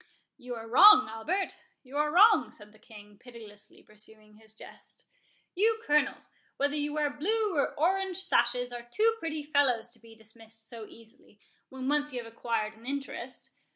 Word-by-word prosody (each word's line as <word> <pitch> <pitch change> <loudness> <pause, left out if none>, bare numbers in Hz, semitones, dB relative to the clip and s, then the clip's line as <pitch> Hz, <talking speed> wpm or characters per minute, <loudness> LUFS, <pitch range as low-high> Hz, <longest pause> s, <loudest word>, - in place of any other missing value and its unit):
"You 250 -2 -7
are 225 0 -8
wrong, 270 - +8
Albert, 310 - -3 0.3
you 265 +1 -13
are 300 +1 +1
wrong," 415 +6 +6
said 210 -1 -16
the 215 - -21
King, 210 -2 -15
pitilessly 220 -4 -14
pursuing 215 0 -14
his 220 0 -10
jest. - - -12 0.5
"You 445 +4 +1
Colonels, 295 -2 0 0.3
whether 285 +1 0
you 295 0 -2
wear 300 -1 -1
blue 410 +7 -1
or 285 - 0
orange 375 +3 0
sashes, 245 -9 0
are 240 - -6
too 450 - +2
pretty 315 -4 -4
fellows 270 -6 +1
to 235 - -17
be 225 0 -16
dismissed 220 0 -12
so 225 -2 -9
easily, 225 -2 -16 0.3
when 260 0 -6
once 295 +1 0
you 245 -1 -4
have 230 0 -13
acquired 225 -2 -2
an 230 +3 -15
interest. 280 0 -6
250 Hz, 170 wpm, -29 LUFS, 225-300 Hz, 0.5 s, wrong